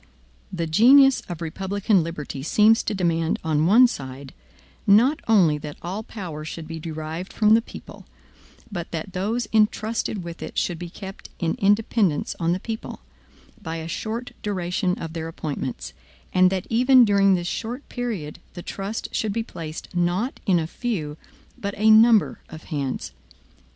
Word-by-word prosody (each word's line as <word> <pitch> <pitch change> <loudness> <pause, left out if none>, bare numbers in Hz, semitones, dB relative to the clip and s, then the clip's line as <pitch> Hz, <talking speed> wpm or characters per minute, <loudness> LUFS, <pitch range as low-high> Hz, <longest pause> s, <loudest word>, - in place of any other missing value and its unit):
The 170 -2 -2
genius 260 - +6
of 175 -1 -5
republican 195 +4 0
liberty 155 -4 -5
seems 215 +9 +4
to 215 - -3
demand 165 -3 0
on 155 0 +1
one 230 +7 +7
side, 135 - -5 0.5
not 240 +9 +5
only 175 -10 +4
that 150 0 -8
all 190 +5 -4
power 180 -9 -7
should 155 +1 -7
be 165 0 -6
derived 160 +3 -6
from 215 -1 +4
the 225 - +5
people, - - -12 0.6
but 175 -4 -5
that 170 +3 -5
those 215 +6 -1
intrusted 215 -2 +1
with 170 -1 -8
it - - -7
should 175 -7 -1
be 175 - -6
kept 190 +2 -10
in 165 -2 0
independence 205 -4 +2
on 165 -1 +1
the 180 - 0
people, 225 +2 -6 0.6
by 165 -4 -5
a 160 0 -5
short 225 +7 -4
duration 180 -2 -1
of 165 -1 -6
their 165 -1 -4
appointments; 140 - -5 0.4
and 185 0 +5
that 185 0 -2
even 250 +2 +5
during 200 -2 +4
this 175 -1 -3
short 235 +8 -4
period 205 - -4 0.2
the 175 - -7
trust 200 +3 -4
should 215 - 0
be 225 +1 -1
placed 165 -3 -8
not 175 +8 0
in 185 -3 +4
a 165 - 0
few, 165 -6 -3 0.4
but 200 -3 -4
a 215 +2 +5
number 220 0 +5
of 160 -1 -10
hands. 140 -3 -3
185 Hz, 160 wpm, -24 LUFS, 165-220 Hz, 0.6 s, one